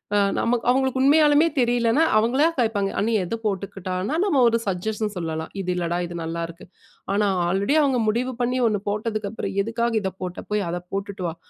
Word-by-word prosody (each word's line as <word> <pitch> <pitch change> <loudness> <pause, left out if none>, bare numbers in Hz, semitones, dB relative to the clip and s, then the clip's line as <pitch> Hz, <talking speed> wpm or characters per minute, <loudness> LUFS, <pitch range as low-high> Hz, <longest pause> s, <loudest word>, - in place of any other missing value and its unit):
அ - - +4 0.2
நம்ம 240 - +2
அவுங்களுக்கு 265 0 +2
உண்மையாலுமே 295 +2 +5
தெரியலனா, 240 +3 +3
அவுங்களா 240 +7 +3
கேப்பாங்க. 215 -4 +1
''அண்ணி! 220 +3 +1
எத 180 +6 -3
போட்டுக்கட்டானா'' 195 - -2
நம்ம 355 -9 +2
ஒரு 230 0 +3
சஜஷன் 210 +3 -2
சொல்லலாம். 160 -2 -4
இது 180 - -5
இல்லடா! 175 -1 -1
இது 175 - -8
நல்லாருக்கு. 165 +1 -5 0.5
ஆனா 205 +1 +2 0.2
ஆல்ரெடி 195 - +1
அவங்க 270 -4 +2
முடிவு 240 +4 0
பண்ணி 250 +1 0
1 210 -2 0
போட்டதுக்கு 210 0 -2
அப்புறம் 225 - -4
''எதுக்காக 230 +2 -1
இத 190 - -1
போட்ட? 180 -1 -5
போய் 210 -1 0
அத 175 - -2 0.2
போட்டுட்டு 195 -1 -4
வா'' 165 - -5
215 Hz, 170 wpm, -23 LUFS, 185-245 Hz, 0.5 s, உண்மையாலுமே